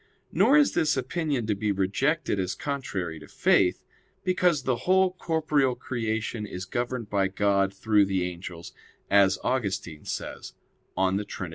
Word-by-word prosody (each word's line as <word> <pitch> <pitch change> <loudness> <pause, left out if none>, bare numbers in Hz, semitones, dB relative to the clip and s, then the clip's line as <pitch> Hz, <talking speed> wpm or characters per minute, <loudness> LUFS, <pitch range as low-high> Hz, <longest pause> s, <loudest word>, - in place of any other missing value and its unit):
Nor 280 - +5
is 295 -1 +4
this 155 -3 +2
opinion 135 -1 -1
to 105 - +1
be 105 +1 -1
rejected 105 - 0
as 95 -1 -2
contrary 95 - -4
to - - -13
faith; - - +2 0.4
because 180 -5 +2
the 130 -2 0
whole 190 0 +5
corporeal 155 -7 +1
creation 110 -3 -3
is 90 -1 -6
governed 120 +2 -3
by 100 -2 +1
God 100 0 +1
through 105 +1 +2
the 95 -2 0
angels, 90 -1 -7 0.4
as 100 -1 +5
Augustine 95 -10 -2
says - - -6 0.4
(De 95 +2 +1
Trin. 95 -3 -6
105 Hz, 145 wpm, -27 LUFS, 95-140 Hz, 0.4 s, Nor